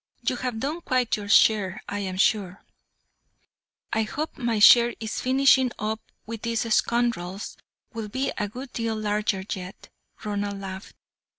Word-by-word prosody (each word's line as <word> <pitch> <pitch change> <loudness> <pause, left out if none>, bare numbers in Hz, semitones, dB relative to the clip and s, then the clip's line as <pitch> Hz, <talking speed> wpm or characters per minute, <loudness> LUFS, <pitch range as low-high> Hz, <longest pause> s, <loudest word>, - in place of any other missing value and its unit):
"You 250 - +1
have 245 -3 -3
done 300 +7 -3
quite 255 -6 +1
your 205 -1 -7
share, 205 -3 +4
I 205 0 -3
am 190 -2 -4
sure." 195 -1 +1 1.3
"I 220 - +2
hope 295 +8 -4
my 235 -4 -1
share 235 +3 +7
in 220 - -5
finishing 260 +2 +3
up 215 +1 -3 0.2
with 225 -1 -7
these 230 -1 -1
scoundrels 220 -6 0 0.4
will 225 -2 -5
be 260 +5 -1
a 205 - -1
good 255 +4 -9
deal 230 -1 -2
larger 210 -2 -1
yet," 185 -2 -9 0.3
Ronald 205 -1 -3
laughed. 190 0 -8
220 Hz, 150 wpm, -25 LUFS, 205-240 Hz, 1.3 s, share